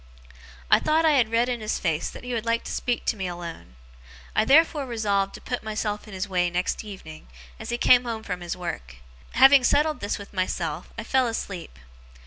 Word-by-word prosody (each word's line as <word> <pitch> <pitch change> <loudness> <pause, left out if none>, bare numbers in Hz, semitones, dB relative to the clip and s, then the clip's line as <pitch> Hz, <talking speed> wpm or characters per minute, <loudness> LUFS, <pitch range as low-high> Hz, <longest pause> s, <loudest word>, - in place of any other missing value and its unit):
I - - +7
thought 315 +1 +2
I 315 - +5
had 250 -7 +3
read 230 +2 +2
in 245 -2 -2
his 215 - -1
face 165 -3 -1
that - - -11
he 250 0 -4
would 230 -2 -1
like 230 0 0
to - - -6
speak 245 -1 -2
to - - +1
me 190 -3 -3
alone. 170 - -8 0.6
I - - +3
therefore 295 0 +4
resolved 200 -4 0
to - - -11
put 245 - -4
myself 210 -1 -3
in 205 - -9
his 190 +1 -3
way 180 -2 +1
next 180 +4 -2
evening, 185 - -10 0.3
as - - -7
he 240 - -1
came 250 0 +5
home 225 -2 -4
from 180 -4 -5
his 175 0 -4
work. 65 - -6 0.4
Having 270 +2 +7
settled 300 +4 +2
this 205 - -2
with 200 0 -11
myself, 180 -4 -3
I 230 - -4
fell 260 +2 +2
asleep. 185 - -5
215 Hz, 210 wpm, -25 LUFS, 180-245 Hz, 0.6 s, I